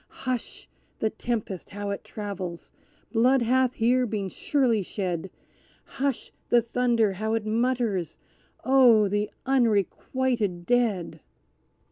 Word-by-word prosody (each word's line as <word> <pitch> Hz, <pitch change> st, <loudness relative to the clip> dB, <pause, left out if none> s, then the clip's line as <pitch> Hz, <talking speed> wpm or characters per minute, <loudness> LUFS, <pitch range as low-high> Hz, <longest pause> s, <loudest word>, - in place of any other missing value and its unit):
Hush! 255 Hz, -2 st, -4 dB, 0.3 s
the 220 Hz, -, 0 dB
tempest, 220 Hz, -5 st, -4 dB
how 205 Hz, 0 st, -4 dB
it 200 Hz, -, -5 dB
travels! 190 Hz, -5 st, -6 dB, 0.4 s
Blood 245 Hz, +3 st, +3 dB
hath 255 Hz, +1 st, +2 dB
here 250 Hz, +2 st, +2 dB
been 200 Hz, -3 st, -3 dB
surely 245 Hz, -2 st, +1 dB
shed 185 Hz, -2 st, -3 dB, 0.5 s
Hush! 275 Hz, -2 st, -3 dB, 0.2 s
the 240 Hz, -, +6 dB
thunder, 235 Hz, -3 st, +1 dB
how 220 Hz, +4 st, -1 dB
it 225 Hz, -2 st, -2 dB
mutters! 225 Hz, -5 st, 0 dB, 0.5 s
Oh, 245 Hz, -5 st, +6 dB
the 205 Hz, +1 st, -1 dB, 0.2 s
unrequited 230 Hz, -4 st, 0 dB
Dead!" 225 Hz, -7 st, 0 dB
225 Hz, 110 wpm, -26 LUFS, 200-250 Hz, 0.5 s, the